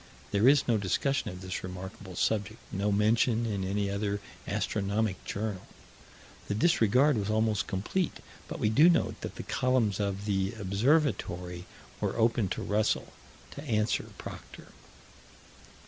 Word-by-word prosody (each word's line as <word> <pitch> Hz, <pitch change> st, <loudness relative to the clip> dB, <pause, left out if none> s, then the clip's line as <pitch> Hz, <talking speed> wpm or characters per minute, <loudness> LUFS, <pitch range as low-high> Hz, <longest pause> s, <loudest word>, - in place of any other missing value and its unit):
There 105 Hz, +4 st, +4 dB
is 140 Hz, +1 st, +5 dB
no 115 Hz, -3 st, +3 dB
discussion 110 Hz, +7 st, 0 dB
of 90 Hz, -1 st, -8 dB
this 95 Hz, -1 st, -4 dB
remarkable 95 Hz, 0 st, -8 dB
subject, 105 Hz, +2 st, 0 dB
no 100 Hz, +2 st, 0 dB
mention 110 Hz, +3 st, +3 dB
in 100 Hz, -4 st, -2 dB
any 100 Hz, +2 st, 0 dB
other 100 Hz, 0 st, -1 dB, 0.3 s
astronomic 100 Hz, -1 st, -1 dB
journal. 100 Hz, -2 st, -4 dB, 0.8 s
The 100 Hz, -, -1 dB
disregard 125 Hz, 0 st, +4 dB
was 100 Hz, 0 st, -2 dB
almost 110 Hz, -2 st, +1 dB
complete 115 Hz, -, -1 dB, 0.3 s
but -, -, -5 dB
we 105 Hz, -, +1 dB
do 155 Hz, +10 st, +7 dB
note 175 Hz, -, +1 dB
that -, -, -6 dB
the -, -, -6 dB
columns 125 Hz, -6 st, +1 dB
of 100 Hz, 0 st, -2 dB
the 95 Hz, -1 st, 0 dB
Observatory 100 Hz, -, 0 dB, 0.3 s
were -, -, -2 dB
open 115 Hz, -2 st, +2 dB
to -, -, -3 dB
Russell 105 Hz, +1 st, 0 dB, 0.4 s
to -, -, -8 dB
answer 110 Hz, -4 st, 0 dB
Proctor. -, -, -10 dB
105 Hz, 140 wpm, -30 LUFS, 100-115 Hz, 0.8 s, do